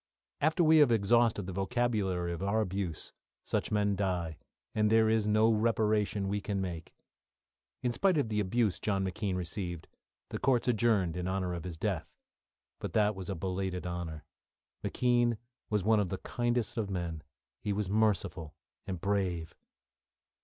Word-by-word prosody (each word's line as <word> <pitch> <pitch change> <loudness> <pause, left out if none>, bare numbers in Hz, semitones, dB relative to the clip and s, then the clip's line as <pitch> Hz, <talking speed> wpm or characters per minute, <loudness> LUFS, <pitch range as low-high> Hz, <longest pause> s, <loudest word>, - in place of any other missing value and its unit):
After 160 +4 +3
we 160 0 +6
have 145 -5 +6
exhausted 115 0 +3
the 95 - -5
vocabulary 95 -4 0
of 85 - -6
our 100 +3 +1
abuse, 95 -5 -2 0.3
such - - -1
men 105 -1 +2
die, 90 -5 -2 0.3
and 105 0 +2
there 110 0 +5
is 110 -1 +2
no 110 +2 +4
reparation 105 -2 +1
we 100 +1 -1
can 100 -1 -2
make. 85 -4 -5 0.9
In 125 - +2
spite 185 +7 +2
of 140 - +2
the 105 -1 0
abuse 105 0 +1
John 95 -2 0
McKean 95 0 -2
received, 90 -1 -4 0.4
the - - -4
courts 130 -2 +2
adjourned 110 -8 +2
in 90 0 -2
honour 95 -1 -1
of 85 0 -5
his 85 -3 -6
death - - -2 0.7
but - - -5
that 105 -1 +3
was 95 -2 -7
a 95 - -1
belated 90 +1 -3
honour. 85 -3 -5 0.6
McKean 120 -2 +2 0.3
was 105 -3 +1
one 110 +1 +4
of 100 -3 0
the 95 - -2
kindest 120 0 -1
of 105 -3 -1
men; 85 -4 -3 0.4
he 105 - -2
was 100 0 -1
merciful 100 -6 0 0.3
and 90 -2 -3
brave. 90 -4 -1
100 Hz, 160 wpm, -31 LUFS, 90-110 Hz, 0.9 s, we